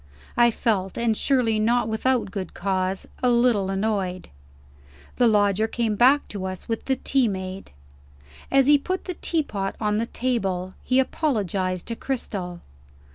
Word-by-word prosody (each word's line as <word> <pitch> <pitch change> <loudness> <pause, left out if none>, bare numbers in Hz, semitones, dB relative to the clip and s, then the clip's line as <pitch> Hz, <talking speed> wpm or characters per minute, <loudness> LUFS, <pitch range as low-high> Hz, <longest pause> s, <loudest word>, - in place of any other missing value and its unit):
I 240 0 +5
felt, 200 -5 -1
and 235 -2 +1
surely 230 -4 +1
not 230 +1 +2
without 225 0 0
good 190 -4 -5
cause, 190 0 -1
a 250 - +3
little 235 -5 +3
annoyed. 195 -2 -2 0.9
The 245 - +5
Lodger 205 0 +3
came 225 -1 -1
back 260 +6 +4
to 195 -2 -5
us 185 -1 -5
with 225 -1 -3
the 265 - +1
tea 265 -1 +1
made. 190 -1 -5 0.8
As 270 -1 +4
he 290 +1 +6
put 370 +6 -3
the 365 - -3
teapot 250 - -2
on 210 -1 0
the 230 - -1
table, 195 -9 -2
he 255 - +1
apologized 195 - -1
to 230 - -4
Cristel. 195 -10 -4
220 Hz, 150 wpm, -24 LUFS, 190-245 Hz, 0.9 s, he